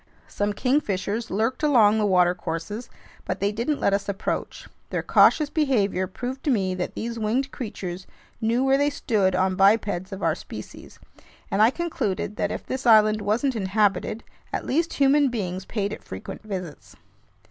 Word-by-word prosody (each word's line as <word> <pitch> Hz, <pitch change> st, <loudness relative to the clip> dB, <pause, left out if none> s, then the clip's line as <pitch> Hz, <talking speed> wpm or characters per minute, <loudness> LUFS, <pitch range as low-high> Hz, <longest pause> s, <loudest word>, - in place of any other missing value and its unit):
Some 205 Hz, 0 st, -2 dB
kingfishers 225 Hz, -4 st, -1 dB
lurked 225 Hz, +6 st, -1 dB
along 225 Hz, -8 st, +4 dB
the 210 Hz, -, +2 dB
watercourses, 180 Hz, +3 st, 0 dB, 0.3 s
but 185 Hz, -, -3 dB
they 200 Hz, +1 st, +1 dB
didn't 235 Hz, +8 st, -1 dB
let 200 Hz, -, +2 dB
us 200 Hz, 0 st, -1 dB
approach. 200 Hz, +1 st, -3 dB, 0.2 s
Their -, -, -2 dB
cautious 305 Hz, -2 st, +4 dB
behavior 210 Hz, -, +1 dB
proved 250 Hz, +8 st, -6 dB
to -, -, +1 dB
me 195 Hz, -7 st, +1 dB
that 180 Hz, -1 st, -4 dB
these 230 Hz, 0 st, -4 dB
winged 245 Hz, +6 st, 0 dB
creatures 185 Hz, -6 st, -6 dB, 0.3 s
knew 230 Hz, +3 st, +1 dB
where 270 Hz, +1 st, +3 dB
they 285 Hz, 0 st, +3 dB
stood 205 Hz, -9 st, 0 dB
on 185 Hz, +1 st, +2 dB
bipeds 195 Hz, -2 st, +2 dB
of 195 Hz, 0 st, -6 dB
our -, -, +3 dB
species, -, -, -10 dB, 0.5 s
and 200 Hz, -, +2 dB
I 220 Hz, -, +7 dB
concluded 245 Hz, -, -3 dB
that -, -, -1 dB
if -, -, -5 dB
this 260 Hz, 0 st, -3 dB
island 215 Hz, -1 st, +6 dB
wasn't 235 Hz, +6 st, 0 dB
inhabited, 205 Hz, +1 st, 0 dB, 0.3 s
at -, -, -3 dB
least 330 Hz, +5 st, 0 dB
human 280 Hz, +1 st, +4 dB
beings 190 Hz, -5 st, -4 dB
paid 205 Hz, -2 st, -2 dB
it -, -, -9 dB
frequent 95 Hz, -, -8 dB
visits. 185 Hz, -7 st, -7 dB
215 Hz, 165 wpm, -24 LUFS, 190-250 Hz, 0.5 s, I